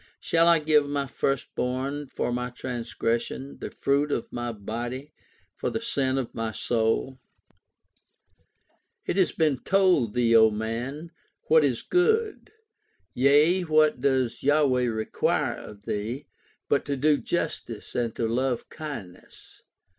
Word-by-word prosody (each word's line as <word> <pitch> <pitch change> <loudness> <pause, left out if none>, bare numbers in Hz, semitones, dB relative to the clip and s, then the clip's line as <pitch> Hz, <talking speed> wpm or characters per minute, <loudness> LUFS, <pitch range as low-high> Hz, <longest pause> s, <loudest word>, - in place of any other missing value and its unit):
Shall 165 0 +2
I 170 -1 +6
give 150 -2 +2
my 140 -1 -1
first 135 0 -2
born 135 +3 -2
for 125 - -2
my 125 0 -2
transgression, 120 +1 -3
the - - -5
fruit 140 +2 0
of 120 - -3
my 120 0 -3
body 120 +7 -6 0.4
for - - -3
the 225 - -2
sin 135 - -1
of 130 -3 -3
my 115 -1 -3
soul? 120 +4 0 1.9
It - - -1
has 190 - +3
been 150 -5 +1
told 180 - +2
thee, 115 -1 +3
O 110 -1 +7
man, 120 +9 -4 0.4
what 160 -1 +6
is 130 -5 0
good. 435 +5 +1 0.6
Yea, 145 +8 +4
what 155 -5 +3
does 130 -3 +1
Yahweh 140 -3 +3
require 110 -2 0
of 100 -1 -11
thee, 115 +9 -4 0.4
But 140 - +2
to 140 -1 -2
do 150 +2 +3
justice 140 -11 -4
and 120 -2 -1
to 115 - -1
love 125 +1 -1
kindness. 120 - -10
130 Hz, 135 wpm, -26 LUFS, 120-150 Hz, 1.9 s, O